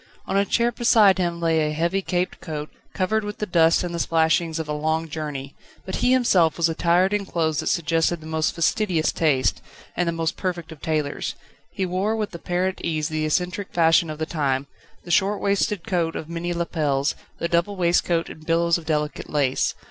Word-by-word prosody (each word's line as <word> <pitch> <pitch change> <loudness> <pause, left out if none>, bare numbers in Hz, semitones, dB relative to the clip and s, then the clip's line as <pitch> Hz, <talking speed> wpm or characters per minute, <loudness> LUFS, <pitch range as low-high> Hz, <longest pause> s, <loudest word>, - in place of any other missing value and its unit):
On - - -3
a 200 0 +3
chair 235 +3 +2
beside 215 -6 +4
him 170 -1 -1
lay 165 -1 +2
a - - -3
heavy 170 +5 0
caped 180 -1 -2
coat, 150 -2 -5 0.2
covered 215 +4 0
with 210 0 -5
the 210 - -2
dust 165 -3 +3
and 175 -1 -4
the 170 - -3
splashings 160 0 +1
of 160 -1 -4
a 150 - -2
long 160 +2 -1
journey, 145 -3 -5 0.3
but 190 - -3
he 250 - +2
himself 190 -11 +3
was 170 -1 +3
attired 175 +4 +2
in 205 -1 +1
clothes 160 -5 -1
that - - -3
suggested 165 +1 +1
the 155 - -13
most 160 0 -1
fastidious 170 -1 +1
taste, 140 -5 +1 0.3
and 175 - 0
the - - +2
most 165 -1 -2
perfect 175 -3 -3
of 160 - -11
tailors; 155 -3 -2 0.3
he 190 - -2
wore 190 +5 0
with 215 -3 -3
apparent 180 +2 -2
ease 155 -2 -1
the 155 -1 -1
eccentric 180 +5 -1
fashion 165 -1 +4
of 155 - -5
the 160 - -2
time, 140 -4 -1 0.4
the 175 - -7
short 200 +2 +2
waisted 200 -2 0
coat 170 -3 0
of 155 - -5
many 170 +1 -3
lapels, 150 -5 0 0.2
the 170 - -1
double 170 +4 +1
waistcoat 170 -1 +1
and 155 0 -12
billows 170 +1 +2
of 160 - -14
delicate 150 -2 -2
lace. 140 -3 +1
170 Hz, 200 wpm, -23 LUFS, 155-185 Hz, 0.4 s, beside